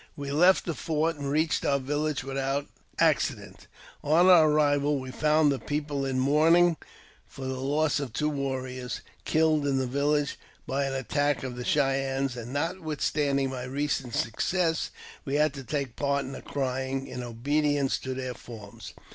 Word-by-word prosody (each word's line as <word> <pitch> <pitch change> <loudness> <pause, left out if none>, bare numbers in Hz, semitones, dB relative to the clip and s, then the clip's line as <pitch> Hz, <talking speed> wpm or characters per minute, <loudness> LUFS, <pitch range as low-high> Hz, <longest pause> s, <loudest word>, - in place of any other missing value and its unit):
|l - - -24 0.2
We 140 - -4
left 180 +6 +4
the 170 - -1
fort, 160 +1 -1
and 140 -1 -4
reached 155 +3 +1
our 140 - +2
village 145 +2 -2
without 135 +1 -2 0.3
accident - - 0 0.4
On 165 +5 +5
our 165 -4 +7
arrival 145 -1 +2
we 130 0 -7
found 150 +1 +3
the 135 - -1
people 145 -2 -2
in 130 -1 -1
mourning 160 +5 +4 0.5
for 135 - -9
the 130 0 -3
loss 150 +3 +1
oi 140 - -2
two 125 +6 -2
warriors, 130 -3 -3 0.2
killed 155 -2 +2
in 135 -1 +1
the 130 - 0
village 140 +2 0 0.3
by 140 +1 -1
an 135 - -2
attack 145 +3 0
of 130 -2 -4
the 125 - -5
Chey 135 0 +2
ennes; 135 -1 -2
and, 120 0 -7
notwithstanding 145 -3 -1
my 130 -1 -5
recent 135 -2 -2
success, 165 - 0 0.3
we 140 0 -2
had 150 -1 +3
take 140 -4 -2
part 140 -1 0
in 130 - -7
the 135 - -7
crying, 135 0 -2
in 125 - -6
obedience 140 +4 0
to 130 0 -4
their 130 -1 -4
forms. 110 -4 -11
140 Hz, 170 wpm, -27 LUFS, 130-150 Hz, 0.5 s, our